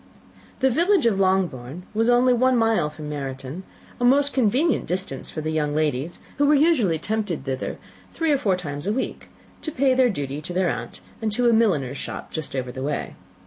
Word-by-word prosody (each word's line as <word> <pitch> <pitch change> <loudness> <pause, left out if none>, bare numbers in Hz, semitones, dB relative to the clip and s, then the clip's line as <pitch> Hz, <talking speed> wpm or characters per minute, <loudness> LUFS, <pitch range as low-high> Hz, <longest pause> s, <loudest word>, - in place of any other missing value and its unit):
The 265 0 +4
village 345 - +3
of 210 -4 +2
Longbourn 180 -6 0
was 225 +2 +2
only 245 +1 +5
one 255 +1 +3
mile 225 -9 +2
from 150 0 -9
Meryton; 135 +2 -5 0.4
a - - -2
most 280 +3 +4
convenient 265 +7 +2
distance 180 -7 -3
for 155 - -5
the 155 +1 -2
young 150 -2 0
ladies, 155 +1 -1 0.2
who 285 - +4
were 300 - +5
usually 275 - +3
tempted 205 -3 -2
thither 130 -1 -3 0.3
three 325 -2 0
or 285 - +3
four 190 -6 +1
times 145 -2 -5
a 205 - +1
week, 260 - -4 0.3
to 310 - -4
pay 265 -1 +2
their 255 -1 +4
duty 145 - -4
to 175 - -6
their 180 -1 +2
aunt, - - -6 0.2
and 220 -1 0
to 245 +2 +2
a 235 - +5
milliner's 155 - +2
shop - - -7
just 155 -3 -5
over 125 -2 -3
the 130 +1 -7
way. 145 +2 -3
190 Hz, 200 wpm, -24 LUFS, 150-250 Hz, 0.4 s, only